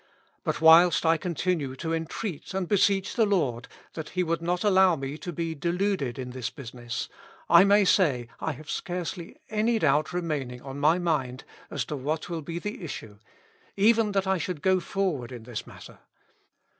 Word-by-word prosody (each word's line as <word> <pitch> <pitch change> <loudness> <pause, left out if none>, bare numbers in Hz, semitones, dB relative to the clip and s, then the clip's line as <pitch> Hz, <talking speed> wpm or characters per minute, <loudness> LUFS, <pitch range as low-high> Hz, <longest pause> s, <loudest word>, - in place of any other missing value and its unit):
But - - -1
whilst 165 +2 +7
I 165 0 +4
continue 165 -4 -2
to 165 +4 -3
entreat 165 +3 -4
and 190 -2 -1
beseech 195 -1 +2
the 225 -3 +3
I^ord, 135 - 0 0.3
that 160 -2 -6
He 185 -1 0
would 165 -1 -1
not 175 +1 -1
allow 190 -3 +5
me 135 -1 -5
to 175 - -5
be 165 0 -3
deluded 170 -4 -1
in 125 -1 -5
this 125 -1 -4
business, 120 -3 -6 0.4
I 170 +3 +7
may 200 0 +5
say 140 - +2
I 160 - -2
have 150 +3 -12
scarcely 175 -1 -5
any 220 +2 +2
doubt 150 -5 +2
remaining 150 -8 -3
on 135 0 -7
my 155 +4 +4
mind 145 -8 -1 0.3
as - - -3
to 150 - -4
what 150 +5 -3
will 170 -2 -3
be 165 +3 -5
the 210 +1 -5
issue, 110 -9 -7 0.6
even 215 +1 +4
that 195 -1 +1
I 190 -1 +1
should 170 -3 -4
go 190 -1 +4
forward 175 -10 -2
in 120 -3 -8
this 120 -2 -6
matter. - - -13
165 Hz, 180 wpm, -27 LUFS, 140-185 Hz, 0.6 s, whilst